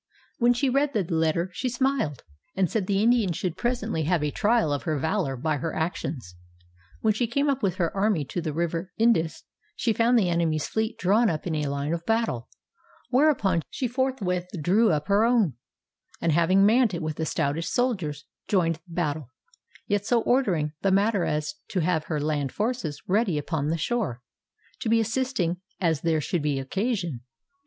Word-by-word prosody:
When 245 0 +4
she 270 +3 +1
read 275 +2 +1
the 210 - +1
letter, 165 +1 0
she 255 - -2
smiled, 245 - -1 0.3
and 190 -4 +1
said 205 -5 -1
the 200 0 +2
Indian 230 -6 +3
should 175 +1 -3
presently 230 -9 -1
have 165 -1 +1
a 150 - 0
trial 215 -6 +2
of 145 - -2
her 155 -3 -1
valor 160 -2 -1
by 150 +4 0
her 165 +3 -3
actions. 145 - -3 0.7
When 220 -1 +3
she 235 +3 0
came 280 +5 0
up 270 -1 -2
with 190 -5 0
her 175 -2 -1
army 195 -6 +1
to 175 - -4
the 160 -2 -2
river 170 +3 -2
Indus, 220 -9 +2 0.3
she 230 - +1
found 235 +2 +3
the 205 -5 +3
enemy's 165 -3 0
fleet 220 +1 -2
drawn 210 +6 +3
up 155 -3 -3
in 170 - -2
a 150 -2 -1
line 140 +2 -2
of 170 0 -3
battle; 225 - 0 0.6
whereupon 250 - +3
she 255 - -2
forthwith 235 -8 -1
drew 200 +9 +3
up 150 0 -1
her 200 +2 +4
own, 230 - +3 0.7
and 165 - +1
having 175 +5 +4
manned 225 -2 +4
it 170 - -4
with 155 -1 -3
the 160 - -1
stoutest 155 +2 -1
soldiers, 185 - -1 0.2
joined 165 -5 +1
battle, 155 -5 -2 0.6
yet 205 -1 0
so 230 +2 +2
ordering 185 - +1
the 195 - +2
matter 200 0 +2
as 150 0 -1 0.2
to 185 - 0
have 160 -1 0
her 155 - -2
land 145 -2 -1
forces 210 - -2
ready 195 -4 +2
upon 150 0 -2
the 165 +2 0
shore, 165 - -2 0.6
to 255 -4 -2
be 225 0 +4
assisting 225 -6 0 0.2
as 160 -5 +1
there 165 -2 +1
should 170 +3 -1
be 145 -2 0
occasion. 175 - -2
180 Hz, 185 wpm, -26 LUFS, 155-225 Hz, 0.7 s, When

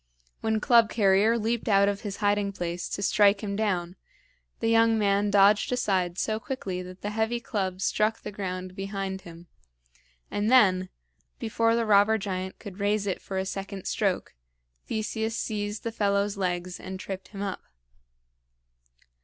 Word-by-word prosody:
When 220 0 0
Club 235 -1 +5
carrier 210 +2 +3
leaped 230 +1 -1
out 200 -1 +5
of 200 0 -1
his 200 -2 -5
hiding 205 -1 +1
place 175 -1 -4
to 200 - -3
strike 205 0 +4
him 200 -1 -2
down, 185 -4 -1 0.6
the 225 - -1
young 225 0 +4
man 205 -1 +2
dodged 205 +2 +4
aside 185 -8 0
so 215 +3 -1
quickly 200 -7 -4
that 180 +1 -11
the 205 - -2
heavy 220 +2 0
club 190 -5 -3
struck 215 +3 +1
the - - -7
ground 185 -2 -5
behind 195 -1 -4
him; 170 0 -12 0.9
and 205 +1 0
then, 190 -7 +5 0.5
before 230 +1 +1
the 230 0 +1
robber 210 +1 +5
giant 190 -2 -4
could 200 -2 -10
raise 205 +1 +1
it 190 -3 -2
for 190 - -5
a 190 - -1
second 195 0 -6
stroke, 195 -4 -1 0.5
Theseus 220 +1 -2
seized 210 -1 -3
the 230 - -2
fellow's 200 -1 +1
legs 180 -2 -2
and 190 0 -7
tripped 190 0 -6
him 200 -1 -6
up. 195 -2 -4
200 Hz, 160 wpm, -27 LUFS, 190-220 Hz, 0.9 s, Club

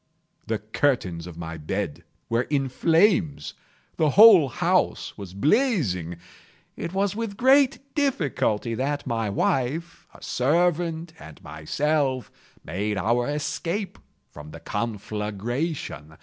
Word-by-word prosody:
The 110 -1 0
curtains 105 - -1
of 85 -2 -10
my 80 -1 -6
bed 80 +2 -4 0.2
were 115 +2 0
in 135 -3 0
flames. 165 - +2 0.4
The 155 - +3
whole 195 -5 +8
house - - 0
was 95 -2 -9
blazing. 130 - +1 0.6
It 170 - -5
was 195 +1 0
with 220 -3 -4
great 270 +2 +4 0.2
difficulty 150 - 0
that 145 +4 -2
my 115 -4 -1
wife, 135 +10 -1
a - - -16
servant, 165 +3 0
and 80 0 -12
myself, 130 - -1 0.3
made 100 +6 -2
our 115 +5 +1
escape 170 +6 -3 0.3
from 75 +1 -11
the 80 +2 -10
conflagration. 105 - -4
130 Hz, 115 wpm, -25 LUFS, 100-170 Hz, 0.6 s, whole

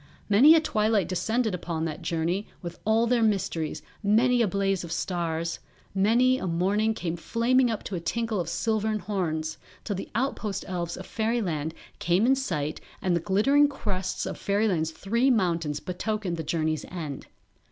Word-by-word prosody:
Many 265 +11 +8
a - - +6
twilight 215 - +1
descended 220 +4 0
upon 165 -2 -3
that 155 -2 -4
journey 170 +5 -1 0.2
with 170 0 -7
all 220 +2 +3
their 240 0 +2
mysteries, 190 -7 0 0.2
many 235 +4 +3
a 230 - +3
blaze 195 -1 0
of 170 - -7
stars; 170 -2 -2 0.3
many 235 +7 +3
a - - -3
morning 200 +6 +1
came 170 -6 -3
flaming 240 +8 +2
up 220 -2 -3
to - - -6
a 180 - -1
tinkle 220 +5 -1
of 175 - -2
silvern 220 -1 0
horns; 170 -6 -2 0.2
till 205 - -2
the 190 - -6
outpost 215 -5 -2
elves 175 -2 -3
of 185 - -8
Fairyland 190 -9 -1 0.2
came 175 +5 +2
in 260 - +5
sight 170 - -2 0.2
and 180 -2 +1
the - - +2
glittering 215 - +4
crests 200 -10 -3
of - - -5
Fairyland's 200 -6 +1
three 230 +10 +1
mountains 170 - +1
betokened 190 0 -3
the 165 - -4
journey's 155 0 -1
end. 155 -6 -6
195 Hz, 165 wpm, -27 LUFS, 170-225 Hz, 0.3 s, Many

